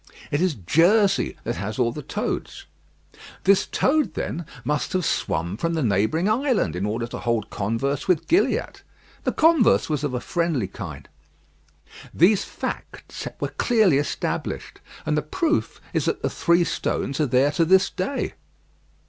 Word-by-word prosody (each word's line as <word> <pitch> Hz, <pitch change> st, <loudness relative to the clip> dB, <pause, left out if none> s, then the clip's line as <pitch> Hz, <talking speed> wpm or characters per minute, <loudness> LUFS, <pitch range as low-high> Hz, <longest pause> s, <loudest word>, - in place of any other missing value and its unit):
It 145 Hz, -, +1 dB
is 180 Hz, -5 st, +1 dB
Jersey 190 Hz, -, +3 dB
that -, -, -3 dB
has 105 Hz, +4 st, -4 dB
all 120 Hz, -2 st, +2 dB
the 150 Hz, -, -6 dB
toads. -, -, -4 dB, 0.8 s
This 195 Hz, 0 st, +4 dB
toad, 270 Hz, -, +1 dB
then, 170 Hz, -1 st, -4 dB, 0.2 s
must 150 Hz, 0 st, -1 dB
have 185 Hz, -3 st, 0 dB
swum 85 Hz, -4 st, -1 dB
from 165 Hz, +5 st, -1 dB
the 160 Hz, -, 0 dB
neighbouring 110 Hz, -, +1 dB
island, 225 Hz, -, +1 dB
in 95 Hz, +3 st, -1 dB
order 115 Hz, +3 st, -2 dB
to 120 Hz, -, -7 dB
hold 115 Hz, -3 st, -1 dB
converse 125 Hz, +8 st, -2 dB
with 180 Hz, -5 st, +1 dB
Gilliatt. 355 Hz, +5 st, +1 dB, 0.4 s
The -, -, +2 dB
converse 320 Hz, -, +4 dB
was 150 Hz, -1 st, -1 dB
of 140 Hz, -4 st, -1 dB
a -, -, -1 dB
friendly 165 Hz, -, -1 dB
kind. 75 Hz, -7 st, -8 dB, 1.1 s
These 190 Hz, +5 st, +4 dB
facts -, -, -6 dB
were -, -, -2 dB
clearly 215 Hz, -, +3 dB
established; 145 Hz, -, -3 dB, 0.3 s
and 150 Hz, -, +1 dB
the 150 Hz, -, +1 dB
proof 315 Hz, -, -1 dB
is -, -, 0 dB
that -, -, -1 dB
the -, -, 0 dB
three 170 Hz, 0 st, +3 dB
stones 140 Hz, -4 st, -2 dB
are 150 Hz, -, +2 dB
there 130 Hz, +3 st, +3 dB
to 160 Hz, +3 st, +2 dB
this 190 Hz, +3 st, +4 dB
day. 195 Hz, +9 st, -2 dB
150 Hz, 155 wpm, -24 LUFS, 120-190 Hz, 1.1 s, This